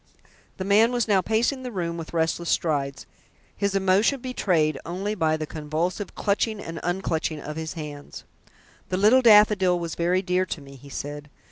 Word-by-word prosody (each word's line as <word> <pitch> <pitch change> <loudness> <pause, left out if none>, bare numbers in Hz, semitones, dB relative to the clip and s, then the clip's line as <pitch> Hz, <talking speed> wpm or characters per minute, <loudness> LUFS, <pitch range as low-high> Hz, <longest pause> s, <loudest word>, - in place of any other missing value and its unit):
The 185 - -4
man 215 +4 +4
was 240 -2 0
now 200 -3 +3
pacing 230 +7 0
the 250 -1 -6
room 170 -5 -3
with 165 -2 -7
restless 165 +1 -1
strides, 140 -5 -1 0.5
his 200 -1 -1
emotion 195 +8 +3
betrayed 175 - 0
only 190 +5 -3
by 160 -5 +1
the 155 - -4
convulsive 160 +6 -3
clutching 210 +1 0
and 165 -4 -6
unclutching 170 -3 -2
of 150 +1 -7
his 160 0 -5
hands. 150 -3 -8 0.7
"The 185 - -1
Little 215 +7 +5
Daffodil 210 -5 +5
was 170 -1 -4
very 180 +2 +1
dear 180 0 0
to 170 - -4
me," 140 -1 -13
he 140 +2 -14
said. 145 +1 -6
180 Hz, 170 wpm, -25 LUFS, 155-205 Hz, 0.7 s, Little